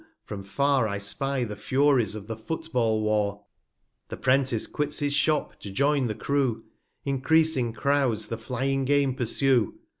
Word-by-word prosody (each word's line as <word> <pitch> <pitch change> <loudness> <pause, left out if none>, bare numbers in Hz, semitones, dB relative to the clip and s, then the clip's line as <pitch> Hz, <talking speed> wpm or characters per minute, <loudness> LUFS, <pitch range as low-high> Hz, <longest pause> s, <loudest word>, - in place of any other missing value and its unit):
from 105 -2 -6
far, 130 +6 +1
225 100 -2 -2
I - - -2
spy 130 +7 -1
the 105 -3 -5
Furies 130 -3 +2
of 105 -2 -7
the 115 +1 -5
Foot 160 +8 -6
ball 110 -3 +1
War: 105 -1 0 0.6
The - - -6
'Prentice 130 -3 +2
quits 150 0 -3
his 145 -1 0
Shop, 150 +1 +1
to 100 - -8
join 140 +5 +1
the 110 - -3
Crew, 135 -3 -1 0.4
Encreasing 140 -2 +2
Crouds 135 -3 0
the 115 - -3
flying 135 +3 -1
Game 140 -1 +2
pursue. 125 -2 +1
130 Hz, 160 wpm, -26 LUFS, 110-140 Hz, 0.6 s, Furies